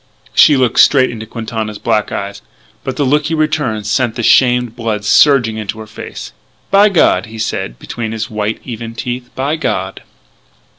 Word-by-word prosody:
She 150 - +6
looked 125 -2 +1
straight 130 -3 +5
into 110 -2 -8
Quintana's 110 -2 -5
black 105 0 0
eyes, 100 0 -5 0.4
but 130 - -4
the 145 - 0
look 150 +3 +2
he 165 - -1
returned 150 -9 -1
sent 110 +2 0
the 120 - -3
shamed 125 -1 +3
blood 110 -3 -3
surging 120 -3 +4
into 105 0 -5
her 110 - -7
face. 105 - -9 0.4
"By 200 +2 +6
God," 115 - +2
he 110 +1 -10
said 85 - -3
between 115 -2 -5
his 110 -1 -3
white, 105 0 -3
even 115 -2 -7
teeth, 125 +1 -5
"by 140 +4 -1
God!" 155 - -3
115 Hz, 170 wpm, -15 LUFS, 110-130 Hz, 0.4 s, She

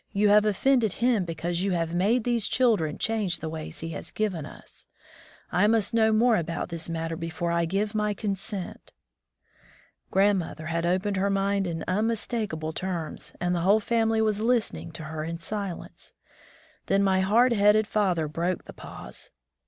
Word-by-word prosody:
You 205 0 +3
have 210 +1 +6
oflFended 225 +1 +2
Him, 235 -5 +1
because 170 +1 -3
you 195 0 0
have 165 -1 -1
made 210 +7 +2
these 235 -3 +1
children 225 -11 +2
change 210 -6 0
the 160 - -5
ways 155 -1 -6
he 165 - -4
has 160 - -6
given 185 -9 -2
us. - - -13 0.6
I 195 +4 +3
must 225 0 +2
know 220 -1 +4
more 230 +1 +4
about 165 0 -3
this 170 -1 -4
matter 165 0 -3
before 165 +1 -3
I 170 0 +1
give 200 +5 -1
my 210 -1 0
consent. 195 -1 -5 0.6
*' - - -31
Grandmother 190 -5 +1
had 165 +1 -1
opened 190 +3 0
her 195 +1 +1
mind 195 0 +1
in 165 -1 -4
unmistakable 210 -5 -1
terms, 165 -4 -4
and 180 0 0
the 175 - 0
whole 200 +5 +4
family 225 0 +1
was 215 -2 +1
listening 230 -7 0
to 160 - -8
her 155 +1 -5
in 165 +1 -4
silence. 195 +1 -6 0.7
Then 195 0 +3
my 190 -1 +3
hard 230 +6 +4
headed 210 0 +4
father 185 -7 +1
broke 170 +4 -2
the - - -11
pause. - - -9
195 Hz, 170 wpm, -27 LUFS, 170-215 Hz, 0.7 s, have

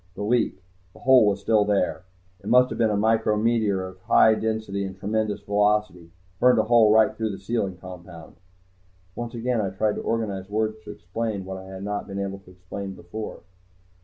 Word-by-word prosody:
The 105 - -5
leak. 110 -4 0 0.3
The - - -17
hole 130 -4 +6
was 100 -1 0
still 105 +1 +3
there. 100 -3 0 0.3
It 100 - -13
must 125 +1 +5
have - - -5
been 115 -2 +3
a 105 - 0
micrometeor 110 -2 +1
of 95 0 -13
high 110 +4 +5
density 110 -3 -2
and 95 0 -6
tremendous 105 +1 -2
velocity. 105 -4 0 0.3
Burned 125 -1 +5
a 110 - +4
hole 110 -1 +5
right 110 0 +5
through 110 -1 -2
the 100 - -5
sealing 100 -3 -2
compound 90 -2 -11 0.4
" 90 0 -36
Once 120 0 -5
again 120 0 0
I 100 - -1
tried 105 +3 -1
to - - -3
organize 100 -4 -3
words 110 +1 -1
to - - -7
explain 100 +2 -4
what 95 0 -6
I 95 - -10
had 95 0 -8
not 105 0 -3
been 100 - -6
able 100 0 -4
to 95 - -19
explain 95 +2 -8
before. 105 +5 -7
105 Hz, 195 wpm, -24 LUFS, 95-110 Hz, 0.4 s, hole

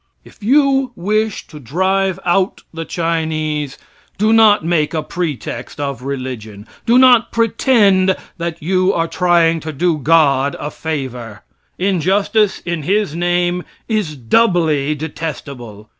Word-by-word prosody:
If - - -18
you 270 +2 +2
wish 215 +3 -1
to 150 - -12
drive 190 +7 0
out 185 +2 0
the 165 0 -5
Chinese, 155 -4 -2 0.4
do 215 +2 +2
not 215 -6 +5
make 165 -2 0
a 155 - -1
pretext 150 -8 -5
of 140 -4 -3
religion. 125 -6 -6 0.2
Do 235 +2 +5
not 250 -3 +5
pretend 210 -5 +3 0.2
that 170 -2 -4
you 185 +2 +2
are 165 0 0
trying 165 -1 +2
to 155 0 -6
do 165 +1 0
God 140 -2 +3
a 150 - -5
favor. 125 -8 -5 0.3
Injustice 195 +3 +1
in 170 -2 -2
His 195 +1 0
name 175 +1 0 0.3
is 210 -9 -1
doubly 155 - +1
detestable. 140 -8 -7
170 Hz, 130 wpm, -17 LUFS, 150-195 Hz, 0.4 s, not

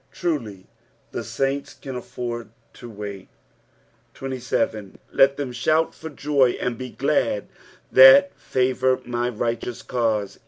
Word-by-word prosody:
Truly, 120 - -3 0.5
the - - -4
saints 135 +1 -2
can 135 -2 -8
afford 120 -1 -5 0.2
to 120 - -11
wait. 100 -3 -8 0.9
27. 125 -6 -3
" - - -35
Let 135 +1 +4
them 140 -3 -3
thovl 155 +7 +1
/or 160 -2 -10
joy, 140 -4 +2
and 125 -1 -2
be 130 +2 -7
glad, - - 0 0.4
that 135 +9 +8
favour 130 0 +1
my 120 0 -1
righttou* 120 +1 -3
caute." 110 -5 -1
125 Hz, 125 wpm, -23 LUFS, 115-135 Hz, 0.9 s, that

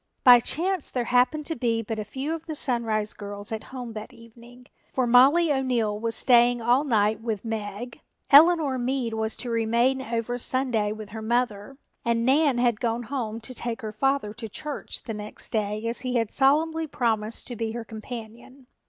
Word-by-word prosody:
By 245 -2 +9
chance 350 +7 -1
there 250 - -1
happened 250 +6 +2
to 325 - -3
be 230 -2 0
but 220 0 -4
a - - -2
few 265 +8 -4
of 330 0 -7
the 315 - -4
Sunrise 225 -6 -1
girls 205 0 -6
at 220 -1 -4
home 250 -3 -7
that 215 0 -7
evening, 235 +2 -16 0.3
for 255 - 0
Mollie 280 +7 +5
O'Neill 240 -6 0
was 230 0 -2
staying 240 -1 +4
all 240 +4 +3
night 215 -5 +1
with 225 -2 -3
Meg, 220 +1 -5 0.3
Eleanor 300 -3 +6
Meade 245 -2 -1
was 220 0 -2
to 245 - -5
remain 235 +4 +1
over 235 0 -3
Sunday 240 -5 0
with 215 -1 -7
her 220 +1 -7
mother 235 +1 -1 0.3
and 235 0 +1
Nan 275 0 +3
had 240 -3 +1
gone 235 0 -1
home 230 -3 -4
to 240 +3 -4
take 235 0 -4
her 215 -1 -5
father 270 -2 0
to 225 0 -7
church 295 +7 -6
the 225 - -5
next 210 0 -7
day 215 0 -2
as 230 +1 -2
he 255 -1 -3
had 230 -3 0
solemnly 315 +4 +2
promised 225 -5 -1
to 245 - -6
be 225 0 -3
her 235 -1 -5
companion. 235 +4 -9
235 Hz, 190 wpm, -25 LUFS, 220-260 Hz, 0.3 s, By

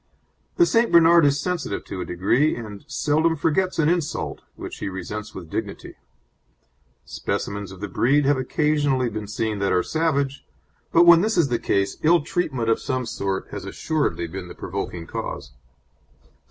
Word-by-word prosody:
The 345 - +5
St. 230 -6 +2
Bernard 170 -1 +7
is 140 0 +1
sensitive 170 - -3
to 95 - -6
a - - -3
degree, 120 - +1
and 105 -4 -8
seldom 160 +2 +1
forgets 165 +5 0
an 155 -2 +3
insult, 170 -3 -1
which - - -8
he - - -3
resents 105 +3 -6
with 90 -3 -8
dignity. - - -5 1.1
Specimens 100 0 -4
of 95 0 -11
the 105 - -3
breed 135 +10 +2
have 145 +1 +4
occasionally 140 -1 +1
been 105 -1 -5
seen 105 0 -2
that 100 0 0
are 90 - +2
savage, 140 -4 -1 0.5
but 170 +1 +6
when 170 -1 +8
this 220 +1 0
is 160 -5 +3
the 120 - 0
case 100 0 0
ill 170 +1 +4
treatment 145 -7 -2
of 115 - +2
some 130 -1 -2
sort 95 -4 -3
has - - -6
assuredly 155 - -1
been 90 +2 -7
the - - -10
provoking 90 -2 -5
cause. - - -6
130 Hz, 165 wpm, -23 LUFS, 100-160 Hz, 1.1 s, when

